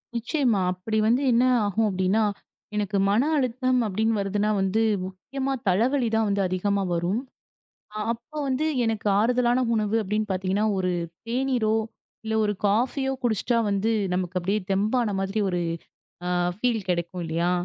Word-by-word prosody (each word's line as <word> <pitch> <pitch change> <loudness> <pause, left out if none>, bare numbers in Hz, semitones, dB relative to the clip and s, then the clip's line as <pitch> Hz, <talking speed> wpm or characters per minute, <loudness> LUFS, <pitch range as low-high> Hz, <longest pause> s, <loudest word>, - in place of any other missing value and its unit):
நிச்சயமா 235 - +1
அப்படி 215 +4 -3
வந்து 245 +4 +3
என்ன 235 +1 +4 0.2
ஆகும்? 215 +2 +1
அப்படின்னா 190 +3 +1 0.5
எனக்கு 205 -1 0
மன 210 +4 +3 0.2
அழுத்தம் 255 -1 +1
அப்படின்னு 220 +3 0
வருதுன்னா 205 +1 0
வந்து 195 +3 +1 0.3
முக்கியமா 265 +9 -4 0.2
தலைவலி 240 +7 +2
தான் 210 -2 +1
அதிகமா 200 +2 0
வரும். 175 +6 0 0.8
அ - - -4 0.2
அப்ப 235 +6 -14 0.2
வந்து 270 +3 0 0.2
எனக்கு 220 -2 -1
ஆறுதலான 245 +2 +2
உணவு 215 -1 0
அப்படின்னு 210 +1 -1
பார்த்தீங்கன்னா 190 +2 0
ஒரு 185 -1 0 0.4
தேனீரோ 245 -3 +1 0.5
இல்ல 220 0 -1
ஒரு 210 - 0
காஃப்பியோ 250 +6 +1
குடிச்சா 235 +1 +1
வந்து 200 +3 +1 0.2
நமக்குத் 185 +2 -1
தெம்பான 210 +3 +1
மாதிரி 195 +2 -1
ஒரு 180 - -1 0.7
அ - - 0 0.3
ஃபீல் 230 -1 0
கிடைக்கும் 175 0 -2
இல்லையா? 170 +2 0
215 Hz, 135 wpm, -25 LUFS, 190-240 Hz, 0.8 s, என்ன